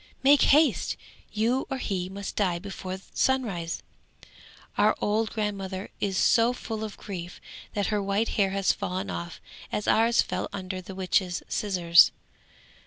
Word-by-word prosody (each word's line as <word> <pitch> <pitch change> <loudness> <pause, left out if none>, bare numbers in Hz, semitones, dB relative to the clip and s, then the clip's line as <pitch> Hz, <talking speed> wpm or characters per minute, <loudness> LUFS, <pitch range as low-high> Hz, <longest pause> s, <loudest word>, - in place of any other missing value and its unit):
Make 280 +1 +6
haste! 300 +2 +3 0.3
you 230 +5 0
or 270 - -2
he 185 -7 -2
must 200 +1 -6
die 185 -4 +1
before 190 0 -6 0.2
sunrise! 200 -11 0 0.9
Our 215 +1 +4
old 215 +1 +1
grandmother 200 -3 -4
is 195 -2 -1
so 235 0 +4
full 220 -3 -5
of 215 -2 -6
grief 175 -4 -7 0.4
that 205 -1 +1
her 210 - +1
white 200 +3 0
hair 200 -3 +2
has 195 0 +2
fallen 185 +1 -3
off 170 -1 -6 0.3
as 210 - -2
ours 230 +1 +4
fell - - -3
under 185 -1 -5
the 185 +1 -9
witch's 185 -1 0
scissors. 175 -5 +5
200 Hz, 145 wpm, -27 LUFS, 185-220 Hz, 0.9 s, Make